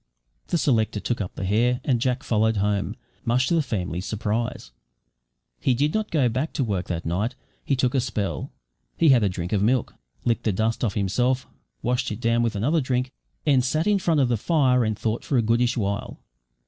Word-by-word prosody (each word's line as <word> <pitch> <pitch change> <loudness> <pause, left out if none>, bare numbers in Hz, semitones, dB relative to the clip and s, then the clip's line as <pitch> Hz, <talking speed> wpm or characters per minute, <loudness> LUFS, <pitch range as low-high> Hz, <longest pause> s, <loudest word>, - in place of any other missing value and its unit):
The 175 - +1
selector 110 -8 +1
took 120 +1 -2
up 90 - -5
the 95 - -4
hare, 120 +6 +2
and 125 -4 +1
Jack 130 +1 0
followed 110 0 +1
home, 100 0 0 0.3
much 125 +2 +2
to - - 0
the 165 - +4
family's 95 - -3
surprise. 110 - -2 0.9
He 125 - +2
did 145 +5 +1
not 215 -1 -1
go 145 -6 +2
back 130 +7 -2
to 135 - 0
work 100 -6 -2
that 85 -2 -3
night; 100 +9 -1 0.3
he 140 - +1
took 130 -1 +1
a 135 - +2
spell. 110 -5 -3 0.5
He 165 - +4
had 130 -4 +6
a 100 - +2
drink 90 0 -4
of 100 - +2
milk, 120 +3 +1 0.3
licked 120 0 0
the 110 - +2
dust 110 +5 0
off 110 -5 0
himself, 125 +6 +1 0.4
washed 125 0 0
it 105 - -4
down 115 0 +2
with 115 -2 0
another 145 +11 +1
drink, 125 -1 -1 0.3
and 135 -4 +4
sat 155 +6 0
in 210 -1 +3
front 165 -4 +2
of 135 - +4
the 120 - +2
fire 130 -2 +3
and 110 -2 -1
thought 110 +1 -2
for 135 - 0
a 115 - +3
goodish 120 +3 +2
while. 100 -2 -2
120 Hz, 210 wpm, -24 LUFS, 105-130 Hz, 0.9 s, had